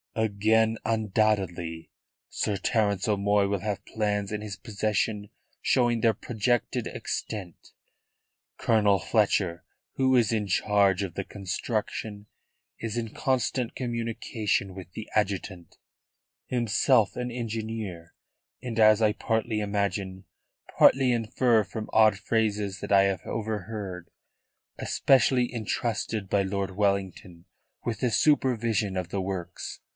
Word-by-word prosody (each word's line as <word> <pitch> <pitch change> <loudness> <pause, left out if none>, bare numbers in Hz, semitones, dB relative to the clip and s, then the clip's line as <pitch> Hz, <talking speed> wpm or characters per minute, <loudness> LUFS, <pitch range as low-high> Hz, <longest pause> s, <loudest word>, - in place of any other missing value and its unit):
"Again 110 +1 +2
undoubtedly. 100 -7 0 0.4
Sir 105 -2 -1
Terence 100 -1 0
O'Moy 100 -1 +2
will 100 0 -1
have 105 +1 -4
plans 105 -2 -1
in 105 -1 -3
his 105 -2 -6
possession 105 -1 -1 0.3
showing 120 -2 +2
their 115 0 +4
projected 120 +2 -1
extent. 95 -6 -6 0.9
Colonel 105 -3 +3
Fletcher, 95 -5 +1 0.3
who 130 -1 +2
is 115 -3 +3
in 105 -2 0
charge 100 0 +2
of 95 -4 -5
the 95 - -3
construction, 105 +1 -4 0.5
is 115 0 -4
in 115 -2 -3
constant 130 -3 0
communication 115 -5 -2
with 90 -2 -9
the 110 - -7
adjutant, 95 -4 -2 0.7
himself 120 -2 +2
an 125 0 -3
engineer; 110 -7 -5 0.5
and 115 -3 -4
as 110 0 +6
I 105 -1 +4
partly 110 0 -1
imagine, 100 -2 -2 0.5
partly 130 -1 +6
infer 115 0 +2
from 110 +2 -7
odd 110 -2 +5
phrases 105 -2 -1
that - - -5
I 100 -1 +6
have 95 -1 0
overheard 105 -4 -4 0.7
especially 125 -2 +3
entrusted 110 -2 -2
by 100 +1 +2
Lord 95 0 -2
Wellington 95 -3 -2 0.4
with 115 -3 -2
the 125 0 +1
supervision 115 -8 +2
of 90 -2 -3
the 95 +1 -2
works." 95 -2 -5
105 Hz, 120 wpm, -27 LUFS, 100-115 Hz, 0.9 s, as